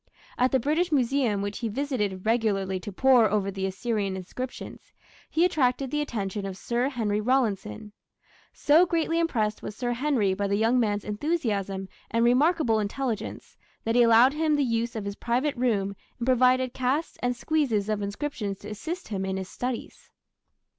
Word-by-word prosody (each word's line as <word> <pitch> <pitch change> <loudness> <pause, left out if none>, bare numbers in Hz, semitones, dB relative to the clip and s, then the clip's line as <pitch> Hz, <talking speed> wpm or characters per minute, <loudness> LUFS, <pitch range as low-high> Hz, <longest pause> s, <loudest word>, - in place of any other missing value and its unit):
At 255 +1 +2
the 265 - +3
British 315 +7 0
Museum, 250 -6 +1
which 205 0 -4
he 230 - -2
visited 210 -7 -2
regularly 200 -5 +1
to 205 - -7
pore 245 +1 +5
over 200 -1 0
the 190 0 -2
Assyrian 200 0 -2
inscriptions, 250 +8 -7 0.4
he 335 +2 +3
attracted 270 -6 +1
the 295 0 0
attention 210 -7 -3
of 190 -1 -6
Sir 240 +5 -1
Henry 215 -6 -1
Rawlinson. 210 - -1 0.6
So 320 +5 +4
greatly 330 0 0
impressed 220 -11 0
was 210 - -6
Sir 245 +1 -2
Henry 240 -7 +1
by 200 +1 -1
the 200 - +1
young 230 +4 +3
man's 210 -3 0
enthusiasm 205 - -2 0.2
and 230 +1 +2
remarkable 255 -2 +3
intelligence 225 +2 -4 0.3
that 225 - 0
he 245 - +5
allowed 235 +3 +6
him 310 0 +1
the 290 - +2
use 230 -1 -1
of 215 -2 -4
his 200 0 -5
private 255 +5 0
room 205 -6 0 0.2
and 235 - -3
provided 255 0 +3
casts 265 +5 -1
and 245 0 0
squeezes 245 -7 0
of 215 -1 -1
inscriptions 205 -1 -3
to 205 - -8
assist 320 - -6
him 195 -3 -2
in 190 0 -2
his 190 -1 -5
studies. 250 -1 -5
235 Hz, 170 wpm, -26 LUFS, 205-265 Hz, 0.6 s, allowed